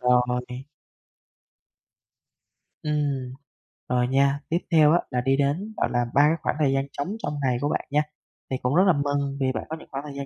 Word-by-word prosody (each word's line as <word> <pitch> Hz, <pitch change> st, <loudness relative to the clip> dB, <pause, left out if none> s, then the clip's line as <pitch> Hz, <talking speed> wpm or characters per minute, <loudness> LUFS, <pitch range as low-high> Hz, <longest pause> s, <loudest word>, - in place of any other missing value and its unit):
Rồi. 125 Hz, +1 st, +1 dB, 2.2 s
Ừm. 145 Hz, -4 st, -1 dB, 0.6 s
Rồi 125 Hz, 0 st, +2 dB
nha, 140 Hz, +2 st, +2 dB
tiếp 165 Hz, -, +2 dB
theo 155 Hz, -2 st, +6 dB
á 175 Hz, -, +4 dB
là 125 Hz, -, 0 dB
đi 135 Hz, +2 st, +2 dB
đến, 155 Hz, +10 st, -1 dB
gọi -, -, +1 dB
là, 120 Hz, 0 st, +1 dB
ba 140 Hz, -, +5 dB
cái 150 Hz, +2 st, +4 dB
khoảng -, -, -1 dB
thời 140 Hz, -3 st, +3 dB
gian 135 Hz, 0 st, 0 dB
trống 145 Hz, -, -2 dB, 0.2 s
trong 150 Hz, -, -2 dB
ngày 125 Hz, -2 st, +2 dB
của 145 Hz, -, 0 dB
bạn -, -, -2 dB
nha. 150 Hz, +1 st, +3 dB, 0.5 s
Thì 130 Hz, -, 0 dB
cũng 125 Hz, +3 st, 0 dB
rất 185 Hz, -, +6 dB
là 185 Hz, -, +6 dB
mừng 140 Hz, -1 st, -1 dB
vì 130 Hz, -1 st, +2 dB
bạn -, -, -4 dB
có 160 Hz, -, -3 dB
những -, -, -14 dB
khoảng 135 Hz, +1 st, -4 dB
thời 150 Hz, -2 st, -8 dB
gian 140 Hz, 0 st, -4 dB
140 Hz, 205 wpm, -25 LUFS, 125-150 Hz, 2.2 s, theo